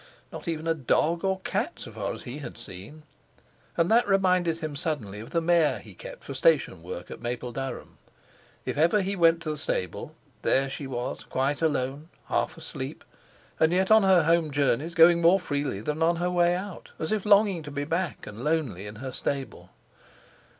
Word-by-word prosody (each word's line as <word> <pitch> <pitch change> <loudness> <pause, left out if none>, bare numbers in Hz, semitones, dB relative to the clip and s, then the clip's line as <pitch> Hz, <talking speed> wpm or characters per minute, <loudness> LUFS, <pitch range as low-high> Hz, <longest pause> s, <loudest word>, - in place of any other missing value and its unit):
Not - - -8
even 160 -1 -2
a 165 - +2
dog 160 +3 +1
or 190 -1 0
cat, - - -1
so - - -9
far - - -3
as - - -7
he 130 +5 -7
had 125 -5 -8
seen. 115 +7 -10 0.7
And 170 +3 +2
that 235 0 +5
reminded 185 -4 +3
him 155 -3 -5
suddenly 135 - -3
of 110 - -9
the 165 - 0
mare 165 -2 +3
he - - -12
kept - - -10
for - - -6
station - - +2
work 485 +2 -7
at - - -8
Mapledurham. 125 +2 -5 0.7
If - - -2
ever 170 +6 +4
he 195 +2 -1
went 165 -2 +4
to 155 - -2
the 150 - -5
stable, 90 - -3 0.3
there 135 0 +2
she 140 - -5
was 125 -2 -4
quite 135 +3 -1
alone, 145 0 -1 0.2
half - - 0
asleep, - - -7 0.6
and 160 +1 +4
yet, 190 +3 +2
on 220 0 +8
her 190 -4 +5
home 165 0 +3
journeys 145 +3 0
going 170 0 +7
more 175 +3 +6
freely 145 - -2
than 150 +7 -3
on 170 +1 +4
her 175 +1 -1
way 175 0 +3
out, 185 0 -6
as 160 - -3
if 215 -3 0
longing 200 -4 +4
to 150 - -8
be 145 0 -3
back 165 +2 -2
and 110 +4 -8
lonely 145 - -1
in 105 - -8
her 130 - -4
stable! 135 -2 -4
160 Hz, 190 wpm, -27 LUFS, 135-175 Hz, 0.7 s, on